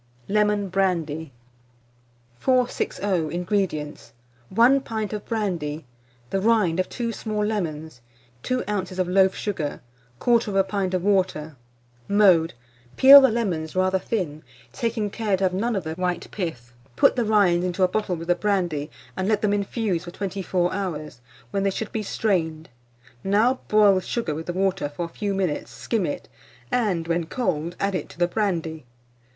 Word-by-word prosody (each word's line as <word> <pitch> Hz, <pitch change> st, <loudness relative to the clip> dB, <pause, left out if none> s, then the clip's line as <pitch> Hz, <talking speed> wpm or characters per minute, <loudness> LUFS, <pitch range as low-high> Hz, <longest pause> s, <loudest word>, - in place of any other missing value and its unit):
LEMON 210 Hz, -1 st, +1 dB
BRANDY. 165 Hz, -5 st, -1 dB, 1.1 s
460. 250 Hz, -5 st, 0 dB, 0.3 s
INGREDIENTS. 175 Hz, -, -2 dB, 0.4 s
1 245 Hz, +7 st, +5 dB
pint 220 Hz, -4 st, -4 dB
of 210 Hz, -, -4 dB
brandy, 170 Hz, -, -2 dB, 0.5 s
the 195 Hz, -, 0 dB
rind 205 Hz, -6 st, +3 dB
of 185 Hz, -, 0 dB
two 235 Hz, -2 st, -3 dB
small 215 Hz, -2 st, -2 dB
lemons, 160 Hz, -, -3 dB, 0.4 s
2 255 Hz, -, -1 dB
oz. 190 Hz, -3 st, -3 dB
of 185 Hz, -1 st, 0 dB
loaf 190 Hz, +1 st, +4 dB
sugar, 165 Hz, -9 st, -3 dB, 0.4 s
1/4 210 Hz, -5 st, +2 dB
pint 190 Hz, -1 st, -1 dB
of 180 Hz, -, -1 dB
water. 185 Hz, -6 st, 0 dB, 0.5 s
Mode. 185 Hz, -6 st, +4 dB, 0.4 s
Peel 275 Hz, +2 st, +11 dB
the 265 Hz, -, +5 dB
lemons 185 Hz, -9 st, -2 dB
rather 185 Hz, 0 st, +2 dB
thin, 175 Hz, -9 st, -3 dB, 0.3 s
taking 225 Hz, -3 st, -2 dB
care 210 Hz, -4 st, 0 dB
to 195 Hz, -, -2 dB
have 185 Hz, -1 st, +2 dB
none 225 Hz, +5 st, 0 dB
of 195 Hz, -, -1 dB
the 160 Hz, 0 st, -4 dB
white 180 Hz, 0 st, -2 dB
pith. 125 Hz, -, -5 dB, 0.2 s
Put -, -, +4 dB
the 245 Hz, -, +1 dB
rinds 200 Hz, -5 st, +3 dB
into 180 Hz, +1 st, 0 dB
a -, -, +6 dB
bottle 190 Hz, -1 st, -1 dB
with 165 Hz, 0 st, -7 dB
the 175 Hz, -, +4 dB
brandy, 175 Hz, -6 st, -1 dB, 0.3 s
and 185 Hz, -, -2 dB
let 215 Hz, -1 st, +1 dB
them 205 Hz, -1 st, +2 dB
infuse 200 Hz, -3 st, -1 dB
for -, -, -7 dB
24 185 Hz, -1 st, -2 dB
hours, 155 Hz, -9 st, -4 dB, 0.3 s
when 200 Hz, -, 0 dB
they 195 Hz, -, +2 dB
should 210 Hz, +2 st, -4 dB
be 220 Hz, -, -2 dB
strained. 165 Hz, -7 st, -1 dB, 0.5 s
Now 220 Hz, +6 st, +2 dB
boil 210 Hz, -2 st, +5 dB
the 185 Hz, -, +1 dB
sugar 205 Hz, -5 st, -2 dB
with 160 Hz, +2 st, -6 dB
the 175 Hz, -, -2 dB
water 190 Hz, -4 st, 0 dB
for 160 Hz, +4 st, -4 dB
a -, -, -8 dB
few 200 Hz, +3 st, -3 dB
minutes, 185 Hz, -6 st, -1 dB
skim 220 Hz, -6 st, -2 dB
it, 145 Hz, -, -5 dB, 0.4 s
and, 190 Hz, -9 st, 0 dB
when 170 Hz, -1 st, 0 dB
cold, 170 Hz, -7 st, -2 dB
add 200 Hz, 0 st, 0 dB
it 185 Hz, -, -3 dB
to -, -, -14 dB
the 175 Hz, 0 st, +2 dB
brandy. 165 Hz, -, -2 dB
190 Hz, 165 wpm, -24 LUFS, 170-210 Hz, 1.1 s, Peel